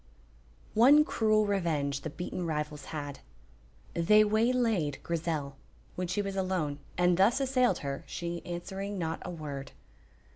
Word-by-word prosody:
One 275 +7 +7
cruel 215 -4 +2
revenge 155 -8 0
the 155 - -4
beaten 175 +3 -5
rivals 150 -1 -3
had. 145 -3 -6 0.7
They 210 +6 +5
waylaid 220 - +1
Grizel, 155 -5 -2 0.4
when 180 0 -2
she 205 +4 -1
was 195 -1 -4
alone, 185 -7 -1 0.2
and 180 0 +3
thus 205 +8 +4
assailed 255 -2 +2
her, 140 0 -3
she 170 0 -4
answering 195 +3 -5
not 165 -2 -3
a - - -6
word. 145 -5 -6
175 Hz, 135 wpm, -30 LUFS, 150-210 Hz, 0.7 s, One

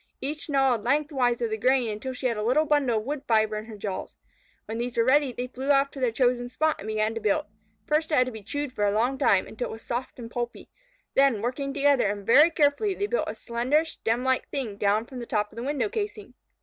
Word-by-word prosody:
Each 300 +3 -5
gnawed 270 -6 +2
length 300 +2 +1
wise 245 -4 +1
of 230 -2 -1
the 220 - -1
grain 255 +1 +3
until 215 +4 -4
she 255 - -7
had 240 -2 +2
a 210 - -3
little 255 +8 +2
bundle 285 -6 +2
of 215 - -2
wood 285 +3 -3
fibre 220 -1 +2
in 215 - -6
her 220 -2 -10
jaws. 200 -2 -5 0.5
When 225 +1 -5
these 240 0 -4
were 230 - +4
ready, 270 +2 +3
they 245 0 -4
flew 260 +2 -6
off 275 0 +4
to 275 - -9
their 250 -3 +1
chosen 245 0 +1
spot 310 +4 0
and 210 - -8
began 215 0 0
to 225 - -5
build. 215 +9 +1 0.4
First 310 +1 0
it - - +3
had 255 - +4
to 255 - -5
be 220 -2 -9
chewed 285 +6 -4
for 210 - -2
a - - +2
long 250 +5 +1
time, 190 - +3
until 230 +3 -5
it - - -6
was 225 - -10
soft 245 +2 -4
and 235 -2 -8
pulpy, 240 -1 -5 0.4
then, 270 -5 +4
working 275 +3 -2
together 280 -4 +3
and 205 -1 -4
very 295 +9 +7
carefully, 330 +7 +1
they 405 - -1
built 485 +4 -1
a - - -5
slender, 255 +7 0
stemlike 255 -3 -1
thing 245 -7 -3
down 205 +2 +1
from 255 0 -9
the 235 - -7
top 210 -1 -1
of - - -16
the 230 - -5
window 285 +7 -1
casing. 420 0 -5
250 Hz, 255 wpm, -26 LUFS, 225-285 Hz, 0.5 s, very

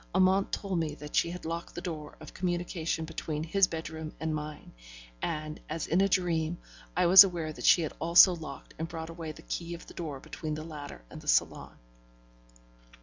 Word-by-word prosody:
Amante 190 +1 +4
told 195 -4 -2
me 155 -2 -2
that 150 0 -8
she - - +3
had 180 0 -7
locked 165 +1 -5
the 175 - -4
door 155 -5 -6
of - - -11
communication 175 -3 -2
between 155 -1 -4
his 190 +3 +3
bedroom 160 -1 -6
and 160 0 -2
mine, 150 0 -6 0.5
and, 155 0 -3
as 160 +1 -3
in 175 +4 +2
a 195 - +3
dream, 170 -3 +1 0.4
I 180 - +4
was 180 +2 +11
aware 170 -5 -3
that - - -6
she 170 - +6
had 155 - -4
also 170 +3 +7
locked 155 -4 -9
and 160 - -2
brought 165 0 -6
away 165 -2 -6
the 160 +1 -13
key 170 0 -4
of 170 - -12
the - - -13
door 150 -5 -5
between 155 +3 -5
the 155 - -6
latter 150 - -8
and - - -9
the - - -15
salon. - - +1
165 Hz, 200 wpm, -30 LUFS, 155-175 Hz, 0.5 s, was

